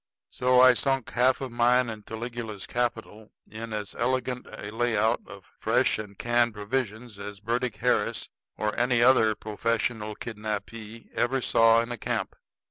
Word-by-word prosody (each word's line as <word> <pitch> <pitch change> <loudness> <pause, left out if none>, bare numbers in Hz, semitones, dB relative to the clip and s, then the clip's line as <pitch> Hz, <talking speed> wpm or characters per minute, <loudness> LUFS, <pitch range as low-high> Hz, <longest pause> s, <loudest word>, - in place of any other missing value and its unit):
So 125 0 +3
I 130 0 +8
sunk 135 0 0
half 125 +2 +3
of 130 -2 -4
mine 120 +1 +3
and 110 -2 -6
Caligula's 110 -2 -6
capital 110 -3 -3
in 115 +1 -7
as 105 -2 -4
elegant 130 -1 -1
a 100 - -8
layout 115 0 +1
of 100 -1 -11
fresh - - +2
and 100 -2 -8
canned 120 -1 +2
provisions 110 0 -3
as 100 0 -7
Burdick 115 +2 -1
Harris 105 - 0 0.3
or 105 0 -1
any 120 -1 +3
other 115 -4 +5
professional 110 0 -2
kidnappee 110 +1 -6
ever 135 +3 +1
saw 115 -2 +5
in 115 +1 -5
a 120 - -3
camp. - - -2
115 Hz, 150 wpm, -27 LUFS, 105-125 Hz, 0.3 s, I